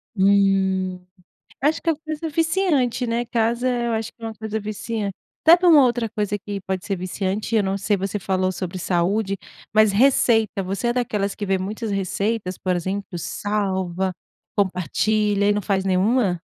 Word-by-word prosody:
Hum, 190 -2 +2 0.6
acho 305 +3 +2
que - - -3
é - - +4
uma 295 - -7
coisa 315 +1 -4
viciante, 310 -6 +1
né, 235 +1 -1
casa 235 +1 0
eu 240 -2 0
acho 225 0 -2
que 230 - -26
é 225 - -3
uma 220 - -5
coisa 220 +1 -4
viciante 210 -1 -4 0.3
até 335 +2 +10
para 355 0 +3
uma 295 -5 +8
outra 240 -2 0
coisa 205 -1 -2
que 205 0 -6
pode 190 -1 -3
ser 195 - -1
viciante 190 +4 -3
eu 215 - +4
não 195 0 -1
sei 205 +1 +1
você 195 +2 -3
falou 185 -1 0
sobre 185 0 -5
saúde, 195 +4 0 0.4
mas 215 -2 +5
receita, 225 -4 +3
você 195 +6 -2
é 240 - +2
daquelas 210 -5 -1
que 210 - -5
vê 195 0 +1
muitas 210 +4 -4
receitas, 195 0 -1
por 185 -1 0
exemplo, 190 +2 -3
salva, 190 0 -2 0.4
compartilha 205 +3 +1
e - - +5
não 205 - 0
faz 190 0 0
nenhuma? 190 -1 +2
205 Hz, 180 wpm, -22 LUFS, 190-230 Hz, 0.6 s, até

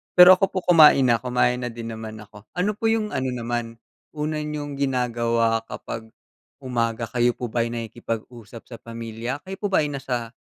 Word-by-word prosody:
Pero 180 +1 +10
ako 195 - +2
po - - -4
kumain 155 -6 +7
na, 115 -1 +3
kumain 125 0 +1
na 125 -1 -3
din 115 0 -7
naman 110 -1 -7
ako. 105 -1 -14
Ano 180 +4 +1
po 225 - -1
yung 225 -1 +1
ano 130 0 -1
naman, 120 -1 -3 0.4
una 155 +1 -2
niyong 150 -2 -5
ginagawa 115 -4 +1
kapag 110 0 -7 0.5
umaga 115 -3 -2
kayo 120 +1 +2
po 125 - -4
ba'y 120 -1 0
nakikipag-usap 115 0 -6
sa 120 - -11
pamilya, 115 +3 -6
kayo 190 +1 -6
po 205 - -1
ba'y 155 -6 +3
nasa 125 -4 -4
120 Hz, 170 wpm, -23 LUFS, 115-145 Hz, 0.5 s, Pero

